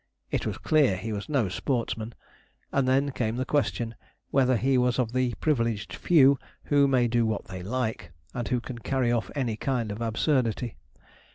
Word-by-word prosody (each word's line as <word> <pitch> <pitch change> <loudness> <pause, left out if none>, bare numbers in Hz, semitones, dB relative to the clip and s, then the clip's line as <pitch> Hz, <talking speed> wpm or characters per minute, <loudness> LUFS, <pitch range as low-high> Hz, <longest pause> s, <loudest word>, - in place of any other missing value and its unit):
It - - -1
was - - -3
clear 145 -11 +3
he 110 +4 -4
was 105 +5 -5
no 135 -8 +2
sportsman; 115 +2 -2 0.6
and 135 -2 +1
then 135 +2 +2
came 115 -3 -1
the 130 +1 -1
question, 120 -5 0 0.4
whether 130 -2 +3
he 135 +3 +2
was 125 -1 +2
of 120 -3 0
the 130 -2 +1
privileged 115 -8 0
few 140 -5 +5 0.2
who 145 -1 +4
may 125 -3 +3
do 120 0 +2
what 110 -2 -1
they 95 -1 -7
like, 115 +3 -3 0.2
and 120 -2 -3
who 125 -1 +1
can 120 0 -7
carry 130 0 0
off 120 -2 0
any 120 -6 -1
kind 120 -5 -1
of 105 +3 -6
absurdity. 115 0 0
125 Hz, 180 wpm, -27 LUFS, 115-135 Hz, 0.6 s, few